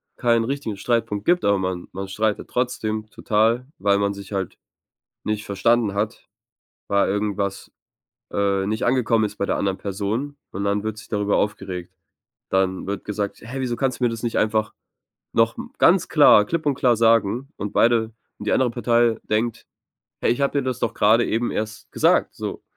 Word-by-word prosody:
keinen 115 -2 +2
richtigen 130 -5 -3
Streitpunkt 115 -2 -1
gibt, 175 +1 +3
aber 100 0 +3
man 95 -2 -3
man 95 +1 -5
streitet 105 +2 -1
trotzdem 110 -3 -2
total, 115 +4 +1
weil 100 +1 +2
man 100 0 0
sich 100 0 -10
halt 95 -3 -3 0.7
nicht 105 -1 -2
verstanden 105 +1 +1
hat, 105 +1 -3 0.6
weil 100 0 +2
irgendwas, 100 -1 -2 0.6
äh, 100 -1 0
nicht 110 +2 -1
angekommen 120 -3 +2
ist 105 0 -4
bei 100 - -1
der - - 0
anderen 95 -1 -1
Person. 105 +8 -3
Und 100 +2 -4
dann 100 0 0
wird 110 0 -4
sich 115 - -12
darüber 105 -1 +1
aufgeregt. 90 -3 -3 0.5
Dann 95 -1 0
wird 100 +1 -4
gesagt: 105 -1 -4
„Hey, 125 +4 -6
wieso 125 -2 -2
kannst 130 0 -1
du - - +2
mir - - +4
das 115 -1 -6
nicht 120 -2 -1
einfach 110 0 +1 0.6
noch - - +2
m - - -7
ganz - - +4
klar 105 - +7
klipp 160 +7 -3
und 145 - +3
klar 125 -3 +3
sagen”, 115 +3 +2
und 105 - -5
beide 115 -1 +3 0.3
und 105 - -5
die - - +2
andere 130 -2 +3
Partei 120 -1 +2
denkt 110 +2 -1 0.6
„Hey, - - +2
ich 120 - -1
habe 140 +1 +1
dir 140 - +1
das 130 -1 -2
doch 115 - -1
gerade 110 +3 +4
eben 115 +2 -1
erst 110 0 -5
gesagt”, - - +2
so. - - -6
110 Hz, 185 wpm, -23 LUFS, 100-120 Hz, 0.7 s, klar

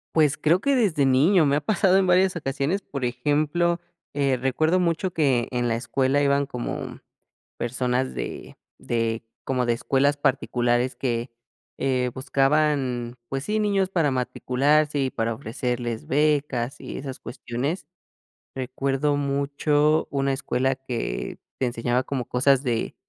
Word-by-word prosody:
Pues 150 -3 +4
creo 160 +4 +3
que 280 +7 +2
desde 185 - +2
niño, 150 +7 +4
me 140 0 +2
ha - - -1
pasado 190 +2 +3
en 195 -1 +2
varias 185 +1 +4
ocasiones, 150 +4 -1
por 140 -7 -4
ejemplo, 150 +7 +1 0.4
eh, 140 -2 +2
recuerdo 155 +7 +2
mucho 180 +1 0
que 135 -7 +2
en 120 -1 0
la 115 - +1
escuela 130 +3 +1
iban 140 0 +2
como 125 -2 -5 0.6
personas 125 +1 -1
de - - -6 0.2
de 115 -1 -1 0.2
como 130 -2 0
de 120 - +3
escuelas 140 +4 +1
particulares 125 -3 +1
que, 120 -1 -2 0.5
eh, 125 -2 0
buscaban, 135 -3 +1
pues 135 0 -3
sí, 215 +1 0
niños 200 -3 +1
para 165 -6 +1
matricularse 140 +4 +1
y 135 -1 +1
para 115 +1 -1
ofrecerles 120 0 -3
becas 145 -3 +1
y - - -6
esas 135 -1 -6
cuestiones. 125 +7 -4 0.7
Recuerdo 135 +2 -1
mucho 145 +2 +1
una 140 -1 0
escuela 130 0 0
que 125 - -4 0.2
te 130 - +1
enseñaba 120 +1 0
como 130 -2 -3
cosas 135 +2 +3
de 120 -4 -1
135 Hz, 140 wpm, -24 LUFS, 125-150 Hz, 0.7 s, Pues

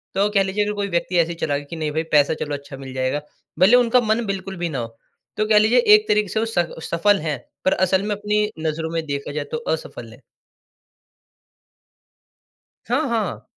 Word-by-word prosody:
तो, 200 +2 +2
कह 200 -2 +3
लीजिए 195 +2 0
अगर 210 - -2
कोई 200 -1 -2
व्यक्ति 175 +1 -1
ऐसे 165 0 +2
ही - - -5
चला 145 -3 -1
गया 145 - -8
कि 165 - -6
नहीं 155 -2 -2
भाई 160 +2 -1
पैसा 145 0 +4
चलो 145 - -3
अच्छा 140 -1 -10
मिल 135 -1 -9
जाएगा, 130 +3 -1 0.4
भले 185 +2 +6
ही - - +5
उनका 245 +1 +3
मन 220 +1 0
बिल्कुल 195 -1 -4
भी 170 -1 -2
ना 135 -5 -3
हो, 115 -1 -7 0.4
तो 215 - +1
कह 215 - +6
लीजिए 225 +4 +4 0.2
एक 215 0 +1
तरीके 210 0 +2
से 220 - -1
वो 225 - +1
स 175 - +4 0.2
सफल 200 +4 +3
हैं, 150 -4 -2 0.3
पर 190 - +4
असल 190 +2 +1
में 205 - 0
अपनी 210 +1 0 0.2
नजरों 160 +1 -3
में 165 -1 -1
देखा 140 -1 -4
जाए 145 -1 -3
तो - - 0 0.2
असफल 115 -6 -10
हैं। 125 - -17 2.7
हाँ, 275 +5 +1
हाँ। 220 -4 -2
180 Hz, 215 wpm, -21 LUFS, 150-210 Hz, 2.7 s, भले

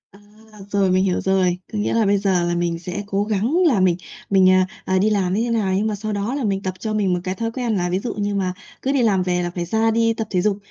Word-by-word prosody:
À, 200 - -18 0.5
rồi 195 -2 +2
mình 185 +1 +3
hiểu 185 -2 0
rồi. 185 -2 +1 0.2
Có - - -2
nghĩa 205 - 0
là 230 -1 +2
bây 200 0 +3
giờ 190 -3 +1
là 175 - 0
mình 170 -1 -1
sẽ 180 +4 -5
cố 200 0 0
gắng 215 +5 -1
là 245 -10 +3
mình 180 -2 +3 0.3
mình, 190 -2 +5
à, 185 0 +4 0.2
à, 190 - +1
đi 205 +3 +3
làm 190 -4 +1
như 210 - +1
thế 240 - -2
nào, 215 -5 0
nhưng 200 +3 +1
mà 215 - -1
sau 215 +1 -4
đó 205 +6 -2
là 285 - -2
mình 195 -3 0
tập 185 - -2
cho 215 +2 -3
mình 200 -4 +1
một 180 - 0
cái 185 0 -3
thói 230 +2 -3
quen 235 -2 -2
là 180 -2 0
ví 180 +2 0
dụ 235 - -4
như 205 -1 -2
mà 185 -2 -1 0.3
cứ 270 - 0
đi 275 -2 +2
làm 200 -5 +2
về 180 -1 0
là 175 - -2
phải 175 -1 -4
ra 220 +5 +1
đi 230 0 +2
tập 225 -1 -4
thể 180 -3 +1
dục, 205 0 +1
200 Hz, 305 wpm, -21 LUFS, 185-215 Hz, 0.5 s, mình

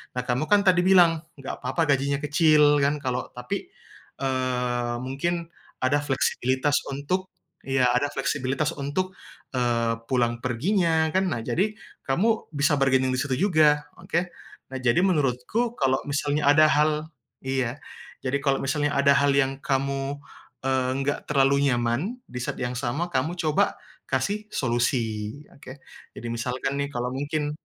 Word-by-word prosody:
nah, 125 - -1
kamu 125 +5 0
kan 205 -1 +5
tadi 180 -1 +5
bilang, 170 -4 +5 0.2
"Nggak 135 - -6
papa 130 +6 0
gajinya 140 +1 +1
kecil." 150 0 +4
Kan 145 +1 +1
kalau 125 -1 -2
tapi, 125 0 -5 0.5
eee, 125 -2 -1
mungkin 170 +6 -2 0.4
ada 145 +3 +3
fleksibilitas 130 0 +1
untuk 180 +7 -2 0.3
iya, 135 -2 +2
ada 125 +4 +2
fleksibilitas 145 +3 -1
untuk, 150 +7 -3 0.4
eee, 115 -2 +1 0.2
pulang 120 -2 +1
perginya, 160 - +1
kan. 190 0 +3
Nah, 120 - -1
jadi, 200 - 0 0.3
kamu 215 +12 +1
bisa 145 +1 +3
bargaining 130 -1 +3
di - - -1
situ 130 -1 -1
juga. 150 -2 +4
Oke? 175 +1 -2 0.4
Nah, - - -6
jadi 125 +5 +2
menurutku, 170 - +1
kalau 135 0 +2
misalnya 145 0 0
ada 155 +1 +6
hal 155 +1 +1 0.3
iya. 130 0 -2 0.4
Jadi, 135 +2 0
kalau 135 -1 +2
misalnya 145 +2 0
ada 140 0 +5
hal 140 0 +3
yang 135 0 +1
kamu, 135 +1 -1 0.5
eee, 130 -1 +1
nggak 145 +1 -2
terlalu 140 0 +3
nyaman, 120 - -1
di 125 - -6
saat - - -4
yang 125 0 -2
sama 125 +8 -2
kamu 155 +6 0
coba 155 -2 +1 0.3
kasih 200 +11 -1
solusi, 120 -1 -1
oke. 135 0 -12 0.4
Jadi, 120 - -7
misalkan 125 +4 -2
nih 140 - -1
kalau 125 +1 -2
mungkin, 145 +2 -2
140 Hz, 145 wpm, -25 LUFS, 130-155 Hz, 0.5 s, ada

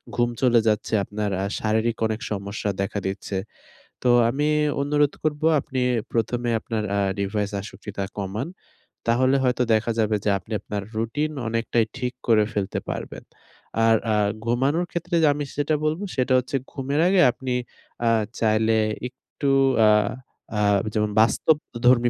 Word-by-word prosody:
ঘুম 120 0 +2
চলে 120 -3 +5
যাচ্ছে, 105 +1 0
আপনার 105 +1 -3
আ - - 0
শারীরিক 110 +2 0
অনেক 110 0 -3
সমস্যা 100 +1 -3
দেখা 100 +1 -2
দিচ্ছে। 95 0 -3 0.7
তো 125 - +2 0.2
আমি 140 +5 0 0.4
অনুরোধ 145 0 +2
করবো 155 0 0
আপনি 130 -2 -4 0.3
১ম 120 +1 0
এ - - +2
আপনার 110 -1 -3
আ - - +1 0.2
ডিভাইস 100 +1 -1
আসক্তিটা 100 0 -6
কমান। 100 - -3 0.6
তাহলে 130 +3 +3
হয়তো 125 -1 +2
দেখা 110 +1 +1
যাবে 110 -1 +2
যে - - +3
আপনি 110 - -18
আপনার 105 -1 -4
রুটিন 130 +8 -1 0.2
অনেকটাই 115 0 +1
ঠিক 125 0 -2
করে 110 -2 +5
ফেলতে 100 -2 -2
পারবেন। - - -5 0.6
আর 115 0 +5 0.2
আ - - +3 0.3
ঘুমানোর 135 +9 +1
ক্ষেত্রে 175 +1 -2 0.2
আমি 145 0 -3
সেটা 145 +2 +1
বলবো, 155 +6 0
সেটা 130 0 +1
হচ্ছে 130 +3 -4 0.2
ঘুমের 140 +2 -2
আগে 185 0 +4
আপনি 130 +1 -4 0.5
আ - - +5 0.3
চাইলে 110 0 +3 0.3
একটু 135 +2 -5 0.4
আ - - +7 0.7
আ - - +1 0.3
যেমন 105 -1 0
বাস্তবধর্মী 120 0 +3
115 Hz, 145 wpm, -24 LUFS, 105-135 Hz, 0.7 s, আ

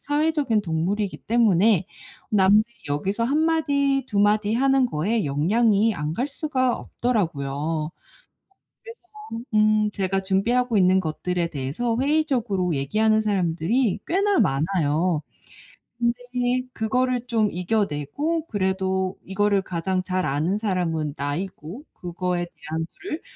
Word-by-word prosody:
사회적인 290 -6 +1
동물이기 185 +4 -1
때문에 210 -4 +3 0.4
남들이 210 +3 +4 0.2
여기서 195 +10 -1
1 280 +5 +1
마디 280 -4 +1
2 205 - -2
마디 210 +1 +3
하는 270 +2 +3
거에 210 +2 0
영향이 205 +9 +2
안 150 +1 -3
갈 250 +9 -1
수가 265 -4 0
없더라고요. 155 - -2 0.9
그래서 460 0 -11 0.5
음 215 0 +3
제가 195 0 -1
준비하고 230 +5 +1
있는 185 0 +4
것들에 175 +1 -2
대해서 150 - -2
회의적으로 245 - +1
얘기하는 215 +11 +2
사람들이 195 +3 0
꽤나 395 +3 +2
많아요. 155 +2 +1 0.8
근데 235 0 +1 0.6
그거를 250 +2 0
좀 220 -3 +1
이겨내고 205 - -1
그래도 190 -1 -1
이거를 200 +1 +1
가장 185 +1 -2
잘 185 0 -1
아는 155 +8 0
사람은 165 -8 -1
나이고 170 - -5
그거에 175 0 -3
대한 160 -1 -5
거를 335 -4 -5
200 Hz, 275 characters per minute, -24 LUFS, 170-235 Hz, 0.9 s, 남들이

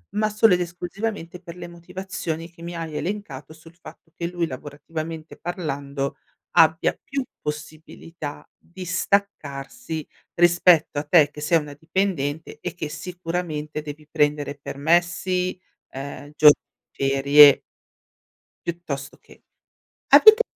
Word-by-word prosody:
Ma 215 0 +2
solo 210 -1 +4
ed 180 - +3
esclusivamente 175 +1 -5
per 170 -1 -10
le 180 - -8
motivazioni 170 -1 -6
che 170 -1 -18
mi 170 0 -6
hai 165 -2 -5
elencato, 170 -8 -5
sul 165 +1 -17
fatto 165 -1 -15
che 170 - -3
lui, 175 -1 -1
lavorativamente 155 +3 -7
parlando, 140 -5 -4 0.4
abbia 160 +1 +4
più 275 0 -3 0.2
possibilità 150 0 -7
di 180 +2 -11
staccarsi 175 - -2 0.3
rispetto 175 -3 +4
a - - -3
te 150 -1 +5
che 150 - -10
sei 165 +2 +3
una 150 -1 -8
dipendente 160 -1 -2
e 180 - -4
che 155 -3 -4
sicuramente 165 -3 -4
devi 150 0 -9
prendere 145 -2 +1
permessi, 175 +5 0 0.3
ehm, 140 +2 -8
gio 150 -1 +9 0.4
ferie. 140 +1 +6 1.1
Piuttosto 155 -5 -5
che - - -20 0.6
avete 435 +1 +9
165 Hz, 120 wpm, -23 LUFS, 150-180 Hz, 1.1 s, gio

